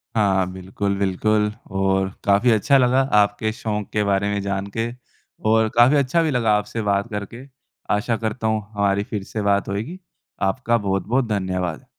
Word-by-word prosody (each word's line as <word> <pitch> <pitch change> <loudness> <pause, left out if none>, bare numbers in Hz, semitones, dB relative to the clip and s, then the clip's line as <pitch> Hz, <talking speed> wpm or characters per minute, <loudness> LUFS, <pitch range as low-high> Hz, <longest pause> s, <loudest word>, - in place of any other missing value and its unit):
हाँ, 95 -4 +2
बिल्कुल, 95 +2 -3
बिल्कुल। 105 +2 +1 0.2
और 95 0 +1
काफ़ी 100 +5 +3
अच्छा 115 +6 +4
लगा 130 0 +3 0.2
आपके 105 +2 0
शौक़ 105 -2 -3
के 105 - +1
बारे 100 0 +1
में 100 - -1
जानके 100 +3 -3 0.6
और 110 0 +3
काफ़ी 120 +5 +6
अच्छा 140 +5 +2
भी 155 - 0
लगा 120 -4 +1
आपसे 105 +2 -4
बात 100 +1 0
करके। 105 +4 -6 0.5
आशा 110 +3 -1
करता 110 +1 -3
हूँ 110 -1 +1
हमारी 100 0 +1
फिर 105 -1 -5
से 110 - -5
बात 100 -1 +1
होएगी। 115 - -4 0.5
आपका 120 +1 0
बहुत-बहुत 105 +5 0
धन्यवाद। 95 -5 -2
105 Hz, 160 wpm, -22 LUFS, 100-115 Hz, 0.6 s, काफ़ी